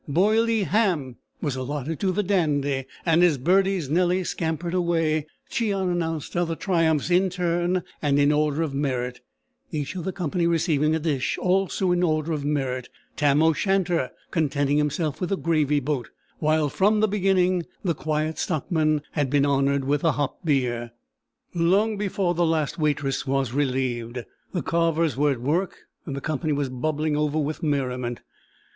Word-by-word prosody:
"Boilee 215 +7 +3
Ham" 175 - 0 0.3
was 145 -4 -1
allotted 145 +3 -4
to 190 - +1
the 205 +3 0
Dandy; 145 -8 0 0.2
and 165 0 +4
as 165 -5 +4
Bertie's 185 +3 +2
Nellie 180 +4 +2
scampered 165 0 -3
away, 165 -4 +1 0.2
Cheon 200 -7 0
announced 165 -3 -3
other 170 -1 0
triumphs 165 -3 +1
in 185 +2 +4
turn 175 0 0 0.2
and 145 -2 +2
in 145 0 +4
order 150 +1 +1
of 150 -4 -3
merit, 125 -3 -2 0.5
each 150 +2 -3
of 180 - -4
the 190 - -2
company 175 -1 -1
receiving 160 -2 +2
a - - 0
dish 150 -5 -1
also 190 0 +1
in 175 0 +2
order 155 -2 +1
of 150 -3 -2
merit: 135 -4 -2 0.3
Tam 145 0 +3
o' 160 0 +5
Shanter 180 -5 +1 0.2
contenting 145 -2 +1
himself 150 0 -1
with 180 - -1
the 195 - 0
gravy 150 -4 +1
boat, 140 -2 -2 0.3
while, 155 -1 +2
from 205 +8 +2
the 215 - +3
beginning, 185 -3 +1 0.2
the 175 -4 +1
Quiet 155 +1 -2
Stockman 155 -1 0
had 145 -4 0
been 140 0 +3
honoured 140 -1 +1
with 145 +1 +1
the 165 -3 +2
hop 145 +5 -3
beer. 120 -6 0 0.6
Long 190 +6 +2
before 195 -3 -1
the 175 0 +1
last 160 -2 0
waitress 145 -3 0
was 135 -3 0
relieved, 125 -3 -1 0.3
the 180 - -2
carvers 165 -2 +1
were 145 +2 +2
at 120 - -8
work, 165 +9 0 0.3
and 140 - -3
the 140 - -5
company 155 +2 -1
was 140 -2 -1
bubbling 150 +4 -1
over 150 0 0
with 155 0 -2
merriment. 125 -5 -2
155 Hz, 165 wpm, -24 LUFS, 140-175 Hz, 0.6 s, o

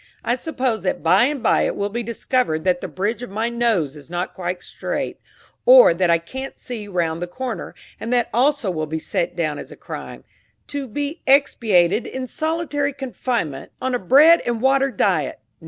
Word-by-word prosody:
I 240 - +1
suppose 255 -5 -2
that 185 - -2
by 185 +8 +5
and 280 -2 -2
by - - +3
it - - 0
will 200 - -1
be 235 +4 -3
discovered 230 -7 -1
that 180 -1 +1
the - - -4
bridge 210 +5 -2
of 245 - -6
my 220 +4 -1
nose 225 - 0
is 145 +1 -13
not 175 +1 -3
quite 180 0 -4
straight, - - -4 0.4
or - - +8
that 175 +1 +1
I 170 - +5
can't 265 +11 -8
see 225 -5 -7
round 170 -4 -1
the 175 - -2
corner, 245 +5 -5 0.2
and 230 - -5
that 245 -1 +2
also 260 -3 +2
will 155 -3 -3
be 160 +1 -3
set 170 +2 -2
down 155 -4 -1
as - - -9
a - - -9
crime, - - -8 0.5
to 285 -2 -4
be 290 +7 -4
expiated 220 -7 +3
in 260 0 -5
solitary 305 -1 -2
confinement, 245 - -3
on 260 0 -2
a 245 - +1
bread 295 - +6
and 240 -1 -1
water 270 +2 +3
diet! - - 0
235 Hz, 190 wpm, -21 LUFS, 175-265 Hz, 0.5 s, or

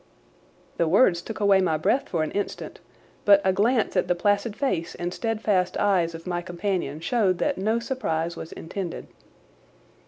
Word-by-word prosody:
The 170 - +2
words 175 -1 +4
took 220 +5 -7
away 200 -2 +4
my 160 -4 +1
breath 245 - 0
for 165 -3 0
an 155 - -3
instant 205 - -4 0.4
but 200 -1 +7
a 190 - +3
glance 220 +4 +1
at - - +2
the 180 - +2
placid 205 +4 0
face 175 - -2
and 175 +1 -4
steadfast 215 -5 0
eyes 180 -5 +1
of 165 - -10
my 175 -1 -2
companion 175 -4 -3
showed 195 -2 +1
that 285 +2 -1
no 215 +4 +1
surprise 170 -10 -2
was 160 - -8
intended. 175 +1 -6
190 Hz, 165 wpm, -25 LUFS, 170-215 Hz, 0.4 s, but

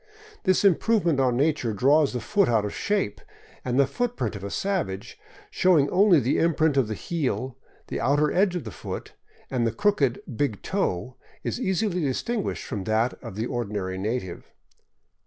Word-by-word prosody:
This 185 +1 +3
improvement 185 -4 +3
on 125 -2 +2
nature 140 -5 +1
draws 140 +7 +3
the 125 - -2
foot 200 - +2
out 110 -3 +2
of 105 - -4
shape, 200 - -1 0.4
and 125 +1 0
the 140 - +6
footprint 245 - -2
of 100 - -7
a 100 - -4
savage, 155 - -3 0.3
showing 155 -7 +3
only 190 -3 +5
the 130 +1 +1
imprint 160 -3 +2
of 135 -5 +3
the 110 - -3
heel, 130 - -2 0.3
the - - -4
outer 145 +4 +2
edge 185 0 +2
of 175 - -3
the - - -7
foot, - - -7 0.4
and 120 -3 +1
the - - 0
crooked 135 - +1
big 115 -6 -1
toe, 125 - -2 0.3
is - - -3
easily 190 -2 0
distinguished 195 - -2
from 100 -3 -5
that 110 +4 +1
of - - -8
the 110 +2 -2
ordinary 105 -6 -3
native. 100 -3 -4
135 Hz, 170 wpm, -25 LUFS, 115-180 Hz, 0.4 s, the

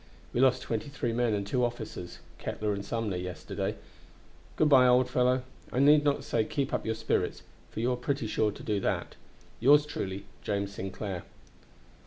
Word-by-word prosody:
We 120 - +2
lost 130 -1 +4
twenty 115 +3 -3
three 120 -5 -2
men 120 -2 +2
and 100 -1 -2
two 125 +5 0
officers 110 -7 -4 0.2
(Ketler 105 -1 -2
and 100 0 -4
Sumner) 110 -3 -2
yesterday. 90 -2 -4 0.8
Good 155 - +3
by, 130 -3 +7
old 125 0 +5
fellow! 125 0 +2 0.3
I - - -4
need 145 +2 +6
not 145 -1 +1
say 120 -6 +1
keep 135 +5 -2
up - - -1
your 110 - 0
spirits, 110 0 -1 0.3
for - - -24
that - - -2
you 120 +2 +2
are - - +1
pretty 135 0 -2
sure 110 0 +1
to - - -11
do. 105 -2 0 0.8
"Yours 145 +5 +6
truly, 100 -8 -4 0.2
"James 100 -1 -2
Sinclair." 95 -1 -4
115 Hz, 180 wpm, -29 LUFS, 100-130 Hz, 0.8 s, by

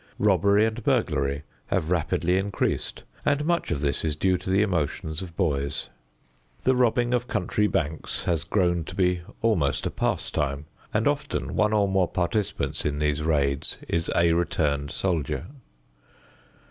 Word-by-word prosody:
Robbery 100 +1 +4
and 110 +1 -3
burglary 70 -5 +1 0.2
have 80 - 0
rapidly 90 +1 +1
increased, 100 0 -2 0.2
and 145 +1 +1
much 170 +1 +1
of 70 - -1
this 70 -2 +1
is 80 -2 0
due 95 +4 +2
to 90 - -6
the 95 +2 +4
emotions 80 -3 -1
of 85 -3 -9
boys. 75 -4 -1 0.7
The 130 - +3
robbing 120 0 +2
of 125 0 0
country 105 -1 +1
banks 80 -4 -2
has 85 -3 0
grown 85 -4 +1
to - - -8
be 90 -2 +2 0.2
almost 90 -12 +2
a - - -1
pastime, 70 0 -1 0.3
and - - +1
often - - -1
one 105 - +3
or 105 -2 +3
more 95 -2 +2
participants 95 +3 -1
in 75 -1 -1
these 75 0 0
raids 70 -3 0
is 85 0 0
a 85 -1 +4
returned 75 -4 0
soldier. 85 -2 -1
85 Hz, 150 wpm, -26 LUFS, 75-100 Hz, 0.7 s, Robbery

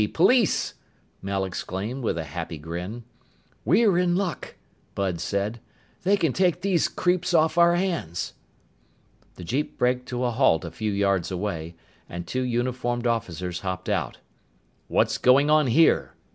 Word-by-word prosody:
Police!" 230 +5 +3 0.5
Mel 95 0 -1
exclaimed 100 +7 -4
with 110 - -1
a 80 - -2
happy 80 +2 -6
grin. 90 +9 -6 0.6
"We're 185 - +4
in 175 -1 +2
luck," 185 -3 -3 0.4
Bud 95 -4 -1
said. 100 +6 -2 0.4
"They 200 +3 +3
can 165 -8 +1
take 180 -2 +1
these 185 -3 +2
creeps 180 -1 0
off 160 0 +3
our 170 0 +5
hands." 170 - -2 1.0
The 90 - -10
jeep 135 - -2
braked 125 0 0
to 125 0 -3
a 125 - +1
halt 115 - +2
a - - -6
few 110 -1 -3
yards 100 -3 +1
away, 90 -4 -4 0.3
and 85 0 -6
two 130 - -2
uniformed 120 0 -1
officers 90 -6 -2
hopped 95 -1 -4
out. - - -1 0.7
"What's - - +1
going 140 +4 +5
on 155 -2 +4
here?" 160 +7 +3
120 Hz, 145 wpm, -25 LUFS, -, 1.0 s, our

